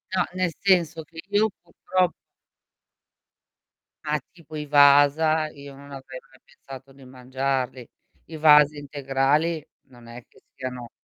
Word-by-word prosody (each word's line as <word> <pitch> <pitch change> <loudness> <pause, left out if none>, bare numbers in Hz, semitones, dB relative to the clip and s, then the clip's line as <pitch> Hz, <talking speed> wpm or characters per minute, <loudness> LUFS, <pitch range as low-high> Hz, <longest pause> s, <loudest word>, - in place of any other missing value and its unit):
No, 180 - +2
nel 185 -2 -1
senso 170 -5 +2
che 165 +2 -14
io 210 +2 +2
purtro 180 +1 -1 1.9
Ah, 150 0 0
tipo 160 -3 -11
i 150 - -5
Wasa, 145 +2 +4
io 140 0 -12
non 140 +1 -14
avrei 130 -1 -9
mai 135 0 -24
pensato 135 0 -14
di 135 -1 -17
mangiarli. 130 -1 -4 0.4
I 160 - -11
Wasa 150 -1 +5
integrali 145 +3 -1 0.2
non 120 -2 -17
è 120 +1 -11
che - - -24
siano, 125 -2 -7
145 Hz, 130 wpm, -24 LUFS, 135-160 Hz, 1.9 s, Wasa